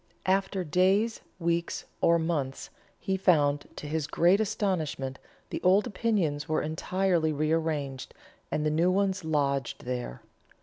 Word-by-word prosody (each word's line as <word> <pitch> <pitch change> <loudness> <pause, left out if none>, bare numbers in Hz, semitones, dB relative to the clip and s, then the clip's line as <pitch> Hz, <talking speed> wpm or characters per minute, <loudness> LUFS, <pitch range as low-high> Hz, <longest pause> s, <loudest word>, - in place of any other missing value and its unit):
After 190 0 +1
days, 190 +7 +2 0.2
weeks, 170 -1 -1 0.2
or 170 0 +5
months, 155 -5 -2 0.3
he 190 0 -1
found 150 -6 +3
that - - -21
to 150 - -6
his 155 -1 -2
great 180 +6 +3
astonishment 175 -11 -2 0.3
the - - -3
old 190 +3 +4
opinions 185 -10 -1
were 155 - +1
entirely 170 +1 0
rearranged, 155 -3 -1 0.3
and 150 - -1
new 170 +3 +3
ones 190 0 +1
lodged 140 -6 -1
there. 125 - -4
165 Hz, 130 wpm, -28 LUFS, 145-190 Hz, 0.3 s, or